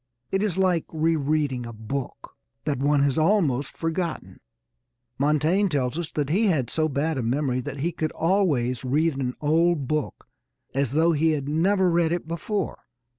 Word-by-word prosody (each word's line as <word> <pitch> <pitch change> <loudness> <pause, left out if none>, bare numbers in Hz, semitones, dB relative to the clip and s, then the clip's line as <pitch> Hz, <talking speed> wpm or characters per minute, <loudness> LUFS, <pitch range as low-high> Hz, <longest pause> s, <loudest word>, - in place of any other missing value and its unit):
It 195 - +1
is 205 -4 -1
like 185 -4 +2
re 160 +1 +1
reading 145 -4 -1
a - - -7
book 115 +5 -6 0.3
that 145 -4 -1
one 145 +1 +3
has 140 +2 +1
almost 155 -6 +1
forgotten. 165 +1 -3 0.8
Montaigne 155 +8 +2
tells 135 -4 -1
us 170 -1 -3
that 145 -1 -1
he 210 +6 +3
had 140 - 0
so 155 -1 +1
bad 145 +1 -1
a - - 0
memory 130 +2 0
that 140 +1 -6
he 170 +4 0
could 155 -2 -2
always 150 - +1
read 150 +4 +1
an 125 -2 -2
old 160 -1 +2
book 155 0 -3 0.5
as 135 -2 0
though 165 +3 +4
he 160 0 +2
had 140 -2 -3
never 185 +5 +2
read 170 -2 +2
it 175 -2 -2
before. 170 +4 -3
155 Hz, 175 wpm, -25 LUFS, 140-170 Hz, 0.8 s, though